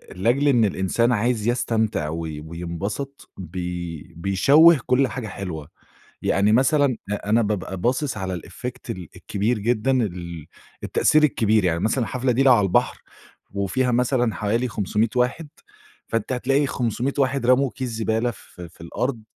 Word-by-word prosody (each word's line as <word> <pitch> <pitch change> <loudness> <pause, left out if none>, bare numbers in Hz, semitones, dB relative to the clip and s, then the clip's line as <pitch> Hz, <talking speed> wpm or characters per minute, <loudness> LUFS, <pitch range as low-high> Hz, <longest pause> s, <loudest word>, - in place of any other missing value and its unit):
لأجل 120 +10 +1
إن 120 -5 +4
الإنسان 100 +5 +1
عايز 115 0 0
يستمتع 110 -9 0
وي 80 -2 -5
وينبسط 90 - -6
بي 90 -2 -6
بيشوِّه 140 - +5
كُلّ 130 +1 +3
حاجة 125 -4 -5
حلوة، 85 -7 -6 0.5
يعني 100 +2 +2
مثلًا 135 +1 +3
أ 105 0 -4
أنا 115 +2 +4
بابقى 95 -3 -2
باصص 125 +7 -1
على 95 -1 -3
الeffect 125 0 -8
ال 90 -7 -6
الكبير 105 +3 -1
جدًا 120 +4 +1
ال 85 - -2 0.4
التأثير 155 0 +3
الكبير، 110 -7 +3
يعني 85 -1 +1
مثلًا 110 +6 0
الحفلة 130 +2 -1
دي 130 +3 +2
لو 130 - +7
على 105 -4 +3
البحر 90 - +1 0.5
وفيها 115 +6 0
مثلًا 120 -2 +1
حوالي 115 +4 0
500 105 +1 0
واحد، 125 +6 0 0.6
فأنتِ 115 +2 -2
هتلاقي 135 +3 +1
500 120 +3 -2
واحد 135 -2 +1
رموا 130 +1 +3
كيس 130 -1 -3
زبالة 110 +1 -1
في 90 -4 -12
في - - -18
الأرض 115 +7 -3
115 Hz, 150 wpm, -23 LUFS, 95-125 Hz, 0.6 s, لو